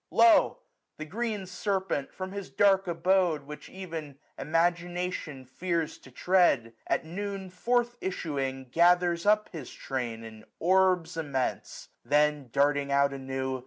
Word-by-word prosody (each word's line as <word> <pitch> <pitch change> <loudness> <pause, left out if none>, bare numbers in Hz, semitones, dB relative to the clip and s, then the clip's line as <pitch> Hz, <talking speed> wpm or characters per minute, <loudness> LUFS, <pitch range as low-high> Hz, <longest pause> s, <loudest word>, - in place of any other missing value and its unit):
Lo! 345 -2 +5 0.4
the 155 - -6
green 210 +2 -3
serpent, 190 -5 -2
from 185 0 -6
his 200 -1 -6
dark 195 -1 +3
abode. 175 -2 +2
Which 150 +1 -10
ev'n 165 -7 -7 0.2
Imagination 170 -2 -1
fears 165 +4 -2
to - - -15
tread. 140 -6 +2
At - - 0
noon 195 +2 -5
forth 240 +5 0
issuing, 135 -8 -3
gathers 175 +2 +3
up 210 0 +3
his 155 -8 -8
train 120 -4 -4
900 115 -1 -9
In - - -17
orbs 180 -2 +2
immense; 140 -5 -3
then, 150 -2 +2
darting 140 +1 +2
out 140 0 +3
anew. 130 -1 -3
170 Hz, 130 wpm, -28 LUFS, 140-190 Hz, 0.4 s, Lo